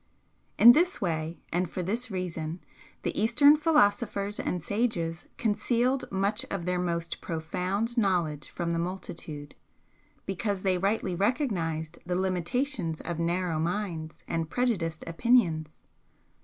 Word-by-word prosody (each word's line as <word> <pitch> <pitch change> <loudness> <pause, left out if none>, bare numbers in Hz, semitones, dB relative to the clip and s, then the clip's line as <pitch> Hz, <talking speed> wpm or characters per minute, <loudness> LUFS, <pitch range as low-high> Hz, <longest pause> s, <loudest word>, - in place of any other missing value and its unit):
In 235 - +11
this 350 +8 +3
way 165 -2 -2
and 175 0 +1
for 180 - -3
this 230 +7 -2
reason 175 -3 -4 0.4
the - - -2
Eastern 245 +8 +6
philosophers 205 -9 +2
and 180 - -1
sages 175 -4 -1
concealed 240 +4 +1
much 200 +2 +1
of 195 -4 -3
their 180 0 0
most 170 -1 -2
profound 185 +8 -2
knowledge 170 -8 0
from 170 -1 -3
the 165 - 0
multitude, 165 -4 -5 0.7
because 195 0 -2
they 185 -2 +2
rightly 195 -1 0
recognised 175 - -1
the 180 0 -2
limitations 185 - -1
of 170 -1 -4
narrow 170 -1 0
minds 170 -2 -3
and 165 -1 -2
prejudiced 185 -11 -1
opinions. 165 -5 +2
185 Hz, 125 wpm, -28 LUFS, 165-220 Hz, 0.7 s, In